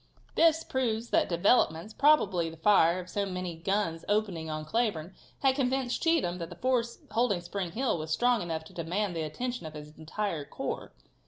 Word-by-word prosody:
This 325 Hz, -1 st, +4 dB
proves 235 Hz, -3 st, -1 dB
that -, -, +3 dB
developments, 175 Hz, +1 st, +2 dB
probably 205 Hz, -, +3 dB
the 165 Hz, -, -11 dB
fire 170 Hz, -1 st, +4 dB
of 180 Hz, -, -7 dB
so 200 Hz, +2 st, -1 dB
many 180 Hz, -3 st, -4 dB
guns 165 Hz, -1 st, -1 dB
opening 200 Hz, -7 st, 0 dB
on 155 Hz, 0 st, -4 dB
Cleburne, 190 Hz, -4 st, -1 dB, 0.3 s
had 270 Hz, -1 st, +4 dB
convinced 260 Hz, -2 st, 0 dB
Cheatham 315 Hz, -, +1 dB
that 165 Hz, -1 st, -5 dB
the 175 Hz, -, -9 dB
force 240 Hz, +2 st, 0 dB
holding 225 Hz, -4 st, +2 dB
Spring 175 Hz, -1 st, -4 dB
Hill 245 Hz, -8 st, 0 dB
was 155 Hz, 0 st, -5 dB
strong 240 Hz, +8 st, +2 dB
enough 165 Hz, -2 st, -3 dB
to 160 Hz, -, -15 dB
demand 175 Hz, +3 st, -2 dB
the 165 Hz, -, -2 dB
attention 240 Hz, +6 st, -4 dB
of 155 Hz, -, -10 dB
his 150 Hz, 0 st, -10 dB
entire 165 Hz, 0 st, -3 dB
corps. -, -, -5 dB
190 Hz, 180 wpm, -29 LUFS, 165-240 Hz, 0.3 s, This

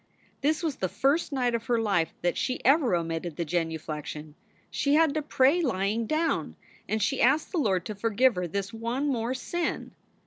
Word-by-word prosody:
This 310 Hz, +4 st, +1 dB
was 310 Hz, -5 st, -1 dB
the 185 Hz, -, -1 dB
first 285 Hz, -, +1 dB
night 250 Hz, -3 st, 0 dB
of 230 Hz, -1 st, -3 dB
her 240 Hz, -2 st, +2 dB
life 195 Hz, -7 st, +1 dB
that 175 Hz, -, +1 dB
she 255 Hz, -, -1 dB
ever 270 Hz, -, +4 dB
omitted 165 Hz, -1 st, -3 dB
that 170 Hz, -, -2 dB
genu 165 Hz, 0 st, -1 dB
flection. 150 Hz, -1 st, -7 dB, 0.4 s
She 285 Hz, 0 st, +1 dB
had 320 Hz, -2 st, +4 dB
to 310 Hz, -, -1 dB
pray 290 Hz, +3 st, +3 dB
lying 220 Hz, -, 0 dB
down, 320 Hz, +4 st, 0 dB, 0.3 s
and 220 Hz, -, 0 dB
she 270 Hz, +4 st, 0 dB
asked 275 Hz, +6 st, +3 dB
the 350 Hz, -, 0 dB
Lord 190 Hz, -, +1 dB
to 215 Hz, -, -4 dB
forgive 230 Hz, +4 st, +2 dB
her 180 Hz, -2 st, -3 dB
this 200 Hz, +4 st, -4 dB
one 235 Hz, +5 st, -2 dB
more 245 Hz, -1 st, -1 dB
sin. 345 Hz, +7 st, -3 dB
230 Hz, 195 wpm, -27 LUFS, 180-280 Hz, 0.4 s, ever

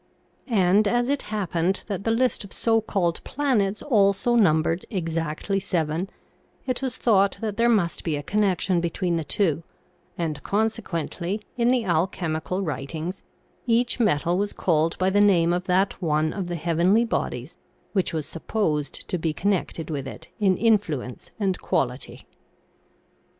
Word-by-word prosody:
And 205 Hz, -2 st, +3 dB
as 240 Hz, +4 st, +1 dB
it 285 Hz, 0 st, +1 dB
happened 190 Hz, -3 st, -1 dB
that 200 Hz, -2 st, -4 dB
the -, -, +2 dB
list 245 Hz, +1 st, +1 dB
of 200 Hz, -, -12 dB
so 225 Hz, -1 st, +2 dB
called 185 Hz, -6 st, -1 dB
planets 220 Hz, -8 st, 0 dB
also 205 Hz, -2 st, +3 dB
numbered 165 Hz, -5 st, +3 dB
exactly 165 Hz, 0 st, -2 dB
seven, 175 Hz, -1 st, -1 dB, 0.6 s
it 255 Hz, -1 st, -2 dB
was 260 Hz, -2 st, -2 dB
thought 200 Hz, -4 st, +3 dB
that 215 Hz, -3 st, -3 dB
there 235 Hz, +2 st, +3 dB
must 195 Hz, -7 st, +1 dB
be 160 Hz, -3 st, -1 dB
a 145 Hz, -, -4 dB
connec 200 Hz, +1 st, +1 dB
tion 180 Hz, -3 st, +2 dB
between 170 Hz, 0 st, -1 dB
the 165 Hz, -, -2 dB
two, 160 Hz, 0 st, 0 dB, 0.6 s
and, 160 Hz, -4 st, -2 dB
consequently, 200 Hz, -2 st, -2 dB
in 240 Hz, -1 st, +2 dB
the 250 Hz, -3 st, +2 dB
alchemical 175 Hz, +1 st, -1 dB
writings, 160 Hz, +3 st, -4 dB, 0.5 s
each 240 Hz, +2 st, +2 dB
metal 175 Hz, -4 st, +2 dB
was 205 Hz, 0 st, -1 dB
called 165 Hz, -2 st, +1 dB
by 185 Hz, +1 st, +2 dB
the 205 Hz, +1 st, +4 dB
name 175 Hz, -4 st, +4 dB
of 180 Hz, +1 st, -1 dB
that 190 Hz, +2 st, +1 dB
one 155 Hz, -2 st, +1 dB
of 190 Hz, -3 st, -3 dB
the 175 Hz, -, -3 dB
heavenly 170 Hz, +7 st, +2 dB
bodies 230 Hz, -, -3 dB, 0.4 s
which 190 Hz, -3 st, +1 dB
was 155 Hz, -3 st, -2 dB
supposed 160 Hz, -4 st, -2 dB
to 180 Hz, -, -2 dB
be 160 Hz, -1 st, -1 dB
connected 175 Hz, -4 st, -1 dB
with 140 Hz, -3 st, -3 dB
it -, -, -9 dB
in 190 Hz, -3 st, +3 dB
influence 185 Hz, -, 0 dB
and 195 Hz, -3 st, 0 dB
quality. 125 Hz, 0 st, -2 dB
185 Hz, 155 wpm, -25 LUFS, 165-210 Hz, 0.6 s, the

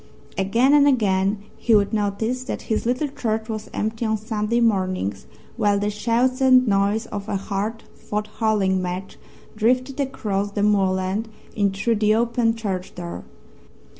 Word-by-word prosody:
Again 230 Hz, +8 st, +3 dB
and 290 Hz, -1 st, +6 dB
again 200 Hz, -6 st, +2 dB, 0.2 s
he 230 Hz, -, +3 dB
would 205 Hz, +1 st, +2 dB
notice 220 Hz, +4 st, -1 dB
that -, -, -4 dB
his 220 Hz, -, -1 dB
little 255 Hz, +5 st, 0 dB
church 220 Hz, -4 st, -2 dB
was 215 Hz, -1 st, -5 dB
empty 220 Hz, +2 st, -2 dB
on 220 Hz, -1 st, +1 dB
Sunday 215 Hz, +1 st, -1 dB
mornings 185 Hz, -, 0 dB, 0.3 s
while 205 Hz, -3 st, +2 dB
the 205 Hz, +1 st, -1 dB
shouts 235 Hz, +5 st, 0 dB
and 255 Hz, -1 st, +6 dB
noise 200 Hz, +2 st, +2 dB
of 205 Hz, 0 st, -6 dB
a 205 Hz, -, -1 dB
hard 205 Hz, +3 st, -3 dB
fought 210 Hz, 0 st, -4 dB
Hurling 200 Hz, -4 st, +2 dB
match 180 Hz, +1 st, -5 dB, 0.4 s
drifted 255 Hz, +5 st, +1 dB
across 205 Hz, -7 st, -2 dB
the 205 Hz, -, 0 dB
moorland 195 Hz, +1 st, +1 dB, 0.3 s
in 200 Hz, -2 st, +2 dB
through 210 Hz, +4 st, 0 dB
the 215 Hz, 0 st, +3 dB
open 230 Hz, 0 st, +1 dB
church 195 Hz, -5 st, -4 dB
door. 175 Hz, -1 st, -7 dB
215 Hz, 155 wpm, -23 LUFS, 200-235 Hz, 0.4 s, and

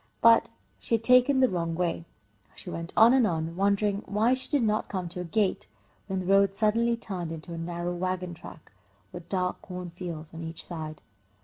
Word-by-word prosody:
But 230 Hz, 0 st, +6 dB, 0.3 s
she 230 Hz, -, 0 dB
had 225 Hz, -, -3 dB
taken 255 Hz, +3 st, +5 dB
the 260 Hz, -, +6 dB
wrong 170 Hz, -5 st, -2 dB
way. 170 Hz, -1 st, -1 dB, 0.5 s
She 180 Hz, -, -9 dB
went 165 Hz, 0 st, -5 dB
on 230 Hz, +3 st, +8 dB
and 255 Hz, -4 st, +4 dB
on, 165 Hz, -2 st, -2 dB
wondering 200 Hz, +1 st, +1 dB
why 220 Hz, +5 st, +2 dB
she 260 Hz, 0 st, -2 dB
did 285 Hz, -5 st, +2 dB
not 215 Hz, -1 st, 0 dB
come 185 Hz, -3 st, -3 dB
to 180 Hz, +1 st, -5 dB
a -, -, -3 dB
gate, 200 Hz, +3 st, 0 dB, 0.4 s
when 190 Hz, -2 st, -2 dB
the -, -, -6 dB
road 195 Hz, +1 st, +4 dB
suddenly 230 Hz, +2 st, +2 dB
turned 185 Hz, -7 st, -5 dB
into 165 Hz, +2 st, -7 dB
a -, -, -5 dB
narrow 175 Hz, +1 st, -3 dB
wagon 180 Hz, 0 st, -2 dB
track, 160 Hz, -, -13 dB, 0.4 s
with 175 Hz, -1 st, -10 dB
dark 180 Hz, -2 st, -1 dB
corn 180 Hz, -1 st, -7 dB
fields 170 Hz, -3 st, -7 dB
on 165 Hz, -, -7 dB
each 165 Hz, 0 st, -7 dB
side. 155 Hz, -3 st, -7 dB
185 Hz, 200 wpm, -28 LUFS, 170-215 Hz, 0.5 s, on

